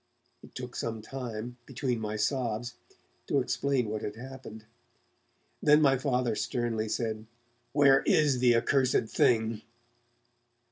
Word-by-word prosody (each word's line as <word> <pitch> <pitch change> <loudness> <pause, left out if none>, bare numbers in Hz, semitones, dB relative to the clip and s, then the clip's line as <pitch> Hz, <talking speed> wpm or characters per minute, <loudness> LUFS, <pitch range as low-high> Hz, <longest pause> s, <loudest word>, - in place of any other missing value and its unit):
It - - -16
took 125 -1 -7
some 110 -2 -4
time, 120 -2 -6
between 125 -2 -2
my 105 -1 -3
sobs, 120 0 -1 0.5
to 140 - +2
explain 135 -1 0
what 105 0 -3
had 105 - -5
happened. 125 -3 -10 1.0
Then 150 0 +6
my 140 -3 +4
Father 125 -3 0
sternly 115 -2 -2
said: 110 -1 -3 0.4
'Where 140 -2 +5
is 145 -4 +3
the 120 -1 +4
accursed 125 -1 +2
thing?' 110 -2 +2
120 Hz, 125 wpm, -29 LUFS, 110-135 Hz, 1.0 s, Then